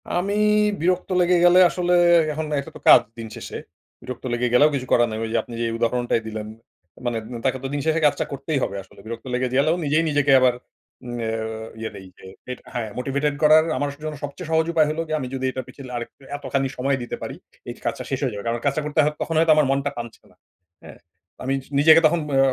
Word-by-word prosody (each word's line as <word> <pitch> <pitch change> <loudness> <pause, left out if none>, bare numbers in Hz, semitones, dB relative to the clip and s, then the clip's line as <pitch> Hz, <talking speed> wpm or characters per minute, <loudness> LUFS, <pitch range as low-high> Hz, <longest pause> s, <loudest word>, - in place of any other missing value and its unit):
আমি 190 +3 -1 0.5
বিরক্ত 180 +1 0
লেগে 180 +1 +3
গেলে 175 +1 +7
আসলে 180 0 0 0.4
এখন 155 +1 -3
এটা 140 - -7
তো - - -9
কাজ, - - +9 0.2
দিন 115 -1 -6
শেষে। - - -8 0.5
বিরক্ত 125 -1 -8
লেগে 120 +1 0
গেলেও 145 +5 +6
কিছু 130 -2 -4
করার 120 0 +4
নাই। 110 - -4
ওই 115 - -3
যে - - +2
আপনি 120 - -11
যেই 115 -1 0
উদাহরণটাই 120 0 0
দিলেন। 110 -1 -5 0.6
মানে 120 -1 -1 0.2
উন 115 - -6
তাকে 130 0 +1
তো - - -2
দিন 145 - -1
শেষে 160 0 +2
কাজটা 145 - +2
করতেই 140 +1 -2
হবে 100 - -3
আসলে। - - -20
বিরক্ত 115 +2 -7
লেগে 125 +1 0
গেলেও, 155 +5 +3
নিজেই 155 +3 +2
নিজেকে 145 -1 +2
আবার 130 -1 +4 0.5
উম 120 0 -5
আ - - -1 0.5
ইয়ে, 110 0 -4
এইযে 95 0 -16 0.3
এট 125 - -6
হ্যাঁ, 115 -3 -3
মোটিভেটেড 140 +3 -1
করার 155 +1 +7
আমার 145 +2 -1
জন্য 155 -1 -4
সবচেয়ে 150 +4 -6
সহজ 160 0 +3
উপায় 155 -2 +4
হল 155 +1 -3
গিয়ে, 155 0 -1
আমি 130 - -4
যদি 130 0 -3
এটার 130 -1 -5
পিছনে 130 -3 -11
আরেকটু 120 +3 -8
এতখানি 140 -1 -1
সময় 135 +2 0
দিতে 120 - -5
পারি, - - -5 0.3
এই - - -4
কাজটা - - -2
শেষ 135 - -2
হয়ে 130 -5 -1
যাবে। 100 -1 -6
কারণ 115 +1 -1
কাজটা 140 +2 +1
করতে 150 +1 -1
হয়, 150 +1 +1
তখন 165 - -2
হয়তো 165 0 +4
আমার 150 -1 +4
মনটা 140 +1 0
টানছে 120 -1 -8
না, - - -26 0.5
হ্যাঁ? - - -12 0.5
আমি 135 +1 -1 0.3
নিজেকে 160 +2 +8
তখন 170 +2 +3 0.2
আ - - +4
140 Hz, 220 wpm, -23 LUFS, 120-155 Hz, 0.6 s, কাজ